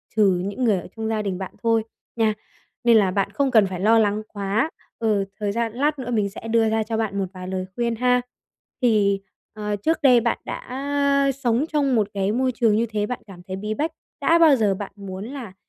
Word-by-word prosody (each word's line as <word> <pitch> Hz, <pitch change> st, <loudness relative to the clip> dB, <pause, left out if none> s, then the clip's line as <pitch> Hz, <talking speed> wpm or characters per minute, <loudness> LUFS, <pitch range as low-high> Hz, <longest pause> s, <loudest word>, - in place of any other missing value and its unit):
trừ 195 Hz, -4 st, +3 dB
những 205 Hz, +6 st, -3 dB
người 215 Hz, -6 st, +3 dB
ở -, -, -9 dB
trong 220 Hz, -1 st, -3 dB
gia 220 Hz, -1 st, 0 dB
đình 195 Hz, -3 st, -2 dB
bạn 190 Hz, -1 st, -6 dB
thôi 225 Hz, -1 st, +3 dB, 0.3 s
nha, 220 Hz, -2 st, +2 dB, 0.5 s
nên 235 Hz, -1 st, +6 dB
là 195 Hz, -3 st, +3 dB
bạn 195 Hz, +1 st, 0 dB
không 275 Hz, -2 st, 0 dB
cần 220 Hz, -4 st, +6 dB
phải 185 Hz, -1 st, -5 dB
lo 225 Hz, +4 st, +5 dB
lắng 210 Hz, 0 st, +1 dB
quá. 205 Hz, +7 st, -1 dB, 0.3 s
Ừ, 210 Hz, -3 st, +1 dB
thời 205 Hz, -1 st, -1 dB
gian 230 Hz, +1 st, -1 dB
lát 285 Hz, +3 st, 0 dB
nữa 245 Hz, -1 st, -4 dB
mình 210 Hz, -4 st, +1 dB
sẽ 215 Hz, +3 st, -9 dB
đưa 225 Hz, -1 st, +3 dB
ra 220 Hz, 0 st, +1 dB
cho 225 Hz, +1 st, -3 dB
bạn 210 Hz, -3 st, -1 dB
một 195 Hz, -, 0 dB
vài 185 Hz, -1 st, -8 dB
lời 185 Hz, 0 st, -3 dB
khuyên 235 Hz, -1 st, 0 dB
ha. 250 Hz, +1 st, +2 dB, 0.6 s
Thì, 205 Hz, -4 st, +3 dB, 0.3 s
ờ, 210 Hz, -1 st, -3 dB
trước 315 Hz, +12 st, 0 dB
đây 250 Hz, -5 st, +6 dB
bạn 235 Hz, -, 0 dB
đã 280 Hz, +1 st, 0 dB
sống 255 Hz, +1 st, +1 dB
trong 280 Hz, -4 st, +2 dB
một 215 Hz, -3 st, +2 dB
cái 195 Hz, 0 st, 0 dB
môi 255 Hz, +3 st, +1 dB
trường 230 Hz, -3 st, +2 dB
như 230 Hz, +2 st, +2 dB
thế, 210 Hz, -1 st, -1 dB
bạn 250 Hz, +3 st, -4 dB
cảm 185 Hz, -3 st, -12 dB
thấy 190 Hz, -, -4 dB
bí 210 Hz, +3 st, -3 dB
bách, 305 Hz, +8 st, -1 dB, 0.3 s
đã 330 Hz, +4 st, +4 dB
bao 320 Hz, -4 st, +7 dB
giờ 210 Hz, -5 st, +2 dB
bạn 200 Hz, 0 st, -6 dB
muốn 195 Hz, -1 st, -7 dB
là, 245 Hz, -6 st, -7 dB
220 Hz, 230 wpm, -23 LUFS, 200-250 Hz, 0.6 s, bao